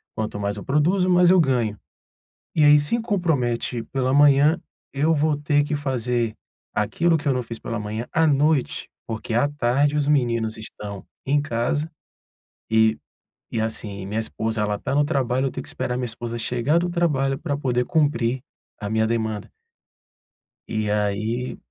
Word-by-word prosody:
quanto 110 -1 -3
mais 100 0 -2
eu 100 - -8
produzo, 175 +7 +2
mais 180 0 +5
eu 185 -1 +6
ganho. 120 -8 +1 0.8
E 155 - +4
aí 150 0 +7
se 150 +12 +2
compromete 130 - -1
pela 130 -1 -1
manhã, 145 +3 +5 0.3
eu 150 +4 +2
vou 150 0 +1
ter 145 0 +2
que 145 +1 -2
fazer 125 -5 -1 0.4
aquilo 165 +11 +1
que 145 - -5
eu 135 - +3
não 125 -1 -1
fiz 115 0 -8
pela 115 -2 -4
manhã, 110 +3 -4
à 160 0 +3
noite, 145 -1 +1 0.2
porque 110 0 -4
à 120 +5 +3
tarde 145 +1 +1
os 145 -1 +1
meninos 115 -6 +1
estão 105 -2 -8 0.2
em 145 +2 +2
casa 145 +4 -1 0.8
e 110 0 +4 0.6
e, 110 - +1
assim, 105 -3 -4
minha 105 +3 -3
esposa 110 0 -2
ela 105 0 0
está 130 - -3
no 145 +1 +4
trabalho, 130 -4 0
eu - - -1
tenho - - -6
que - - -11
esperar 125 - -2
minha 125 - -1
esposa 120 +1 -5
chegar 125 +7 +1
do 175 +1 0
trabalho 135 -6 +1
pra 145 -2 -2
poder 125 -3 0
cumprir 130 -5 +1 0.4
a 105 - -3
minha 110 0 +2
demanda 110 -2 -2 1.2
e 110 -1 -2
aí 105 +4 -1
125 Hz, 170 wpm, -23 LUFS, 110-145 Hz, 1.2 s, aí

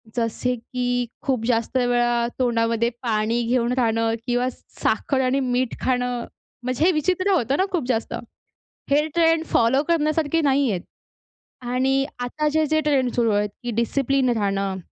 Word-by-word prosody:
जसे 240 +2 -1
की 245 +1 -2 0.2
खूप 255 -5 0
जास्त 230 +1 0
वेळा 240 -1 +2
तोंडामध्ये 230 -1 +1
पाणी 225 +1 0
घेऊन 245 0 +1
राहणं 225 -1 +1
किंवा 245 +1 +1
साखर 265 +1 -2
आणि 265 +2 +1
मीठ 250 -1 0
खाणं 245 -1 0 0.4
म्हणजे 255 +5 0
हे 370 - +5
विचित्र 370 +5 +1
होतं 275 - +1
ना 380 - +2
खूप 350 -7 0
जास्त, 225 -3 -1 0.8
हे 300 +2 +3
ट्रेंड 330 -1 +3
फॉलो 250 +5 +2
करण्यासारखे 320 0 +1
नाही 275 -2 +2
आहेत 180 -3 -2 0.8
आणि 265 +2 +1
आता 300 +5 -2
जे-जे 310 0 +2
ट्रेंड 270 -5 +1
सुरु 230 -2 +2
आहेत 205 0 +1
की 240 - -2
डिसिप्लिन 260 +3 +1
राहणं, 195 -4 0
250 Hz, 145 wpm, -23 LUFS, 235-280 Hz, 0.8 s, हे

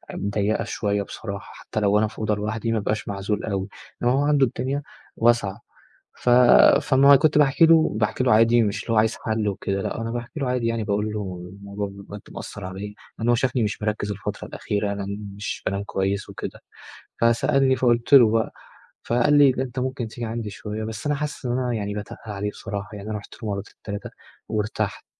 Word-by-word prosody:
ضيِّقة 100 +1 0
شوية 100 -2 -1
بصراحة، 100 -1 -7
حتى 110 - -5
لو 105 0 +3
أنا 110 - +2
في - - -11
أوضة 110 -1 +1
لوحدي، 110 +2 -2
ما 115 - +1
بابقاش 105 +1 -2
معزول 100 +1 -2
أوي. 100 -2 -2 0.3
إنما 120 +1 +3
هو 135 - +2
عنده 145 -2 +4
الدنيا 135 +4 -3 0.3
واسعة. 115 -2 +2 0.5
ف - - -4 0.5
فما 140 +1 +6
كنت 150 +1 +3
باحكي 150 +3 +5
له 160 -7 +4
باحكي 110 +4 +1
له 125 - +4
عادي، 115 +2 +5
مش 100 -2 -1
اللي 115 - -3
هو - - +1
عايز 110 +1 +2
حل 110 -2 -1
وكده، 100 0 -2
لأ، - - -3
أنا 115 0 -3
باحكي 120 +6 -5
له 135 - 0
عادي، 125 -2 0
يعني، 115 -2 -1
باقول 105 +1 -1
له 90 -4 -5
الموضوع 100 +1 -5
بجد 100 +1 -10
مأثِّر 100 - -8
عليَّا، 95 +3 -6 0.2
لأن 115 +1 -1
هو 120 - +5
شافني 125 0 +1
مش 105 0 -2
مركِّز 105 -1 -1
الفترة 100 - -5
الأخيرة، 100 0 -2
أنا 100 -1 -4 0.3
مش 105 - -5
بانام 100 +1 -1
كويس 95 0 -2
وكده، - - -7 0.6
فسألني، 130 +3 +3
فقُلت 120 +1 +2
له 120 -6 +8
بقى، 115 -1 +1 0.5
فقال 120 +4 +2
لي: 140 -2 +7
"أنت 125 0 -5
ممكن 130 -2 -2
تيجي 120 +2 -6
عندي 110 -1 -4
شوية." 105 +2 -6
بس 110 +2 -6
أنا 145 - +1
حاسِس 150 -1 -4
إن 120 - 0
أنا 125 -1 0
يعني 105 -2 -2
باتقِّل 105 0 -6
عليه 105 +1 -2
بصراحة 100 -1 -6
يعني. 105 +1 -7
أنا 105 - -2
رُحت 100 - -12
مرتين، 100 -1 -4
3، 100 -1 -5 0.4
وارتحت، 110 0 -2
110 Hz, 195 wpm, -24 LUFS, 100-120 Hz, 0.6 s, له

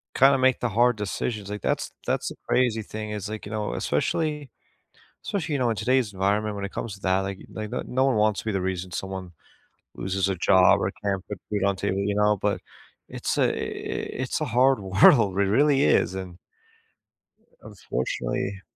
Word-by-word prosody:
kinda 135 +1 +6
make 130 -1 +3
the 125 - -1
hard 120 +2 +3
decisions, 105 0 -3
like, 105 -2 -5
that's - - -1 0.2
that's - - 0
the - - -9
crazy 120 -3 +2
thing 110 0 -6
is, 105 -1 -4
like 110 -1 -6
you 100 - -8
know, 105 -1 -2
especially 150 -4 -1 0.8
especially, 175 -6 -2
you 140 - +1
know, 125 -2 +1
in 115 - 0
today's 125 -4 +1
environment 100 +2 0
when 100 - -4
it 100 - -5
comes 105 -4 -4
to 100 - -14
that, 95 0 +2
like, 95 0 -4
they 110 0 -5
the - - -4
no 130 +1 +1
one 130 -5 +2
wants 105 -1 +2
to - - -15
be 110 - 0
the 95 - 0
reason 90 -1 -3
someone 95 0 -5 0.6
loses 95 0 -1
a 95 - 0
job 95 +2 +5
or 95 - 0
can't 95 -2 -2
put 105 -3 -5
food 105 -2 0
on 100 -1 +2
table, 95 - -1
you 100 +1 0
know, 105 0 +3
but 100 +1 -1 0.5
it's - - -3
a - - +3 0.7
it's 130 - -2
a - - 0
hard 130 0 +3
world. 100 +2 +5
It 100 - +4
really 140 +7 +3
is, 95 - +3
and, 95 -2 -6 1.3
unfortunately 95 +9 -3
105 Hz, 195 wpm, -25 LUFS, 95-120 Hz, 1.3 s, kinda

